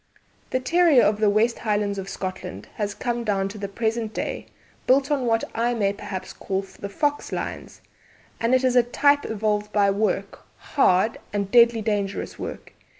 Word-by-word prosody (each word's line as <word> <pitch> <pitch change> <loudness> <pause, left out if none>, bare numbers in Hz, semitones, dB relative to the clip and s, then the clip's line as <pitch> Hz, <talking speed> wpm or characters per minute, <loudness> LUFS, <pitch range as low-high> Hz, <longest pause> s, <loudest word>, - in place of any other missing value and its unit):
"The 255 - 0
terrier 320 0 +4
of 210 0 +2
the 215 -1 +4
West 220 +3 +2
Highlands 205 -2 -1
of 195 0 -6
Scotland 185 - -6
has 205 -2 -2
come 240 +2 -2
down 195 -3 0
to 210 +1 -9
the 200 - -3
present 220 +2 -2
day, - - -4 0.4
built 270 +3 +3
on 270 -4 +1
what 225 0 +2
I 240 +1 0
may 200 -3 +1
perhaps 195 -2 -7
call 195 0 -3
the 200 +1 -9
fox 290 +7 -1
lines, - - -5 0.6
and 230 +3 +3
it 255 - +2
is 255 -1 +2
a 245 - +7
type 285 +4 +2
evolved 210 -1 -1
by 200 -2 +3
work 200 -1 -1 0.2
hard 220 -6 +2
and 200 -1 -2
deadly 235 -2 +5
dangerous 205 -2 -2
work. - - -7
215 Hz, 175 wpm, -24 LUFS, 200-240 Hz, 0.6 s, a